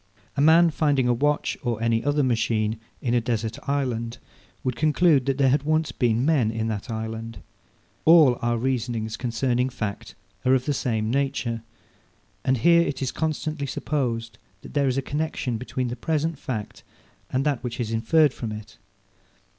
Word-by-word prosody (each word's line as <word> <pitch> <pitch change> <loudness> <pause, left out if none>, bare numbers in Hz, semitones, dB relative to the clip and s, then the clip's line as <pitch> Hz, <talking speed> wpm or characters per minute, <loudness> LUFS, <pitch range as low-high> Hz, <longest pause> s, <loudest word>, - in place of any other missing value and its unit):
A 140 - +1
man 165 +3 +6
finding 145 -5 +2
a 120 - +3
watch 145 +5 0
or 120 -2 -2
any 115 0 +1
other 145 0 +2
machine 110 -3 0 0.2
in 120 -3 0
a 120 - +3
desert 115 -1 -2
island, 125 -4 -1 0.5
would 125 -2 -1
conclude 155 -1 +3
that 135 -1 +1
there 135 -2 +4
had 140 +1 +3
once 155 +2 0
been 120 0 +1
men 145 -8 +3
in 110 0 -2
that 110 +2 -4
island. 110 0 -5 0.7
All 155 -7 +6
our 120 0 +1
reasonings 115 -3 -2
concerning 125 +1 0
fact 105 -5 -5 0.3
are 130 +1 +4
of 130 - 0
the 145 - +1
same 110 -4 -1
nature. 130 -4 -1 0.8
And 130 0 +2
here 170 +8 +5
it 145 -4 -2
is 130 - -1
constantly 155 -2 -2
supposed 120 -5 -2 0.2
that - - -11
there 140 -1 +2
is 130 0 0
a 135 - 0
connexion 145 -5 -2
between 125 0 -3
the 120 - -4
present 155 +3 -1
fact 110 -8 -5 0.5
and 130 +2 0
that 145 -4 0
which 120 -1 -5
is 115 -2 -2
inferred 135 +6 +3
from 115 -3 -5
it. 105 -1 -9
125 Hz, 170 wpm, -25 LUFS, 115-145 Hz, 0.8 s, man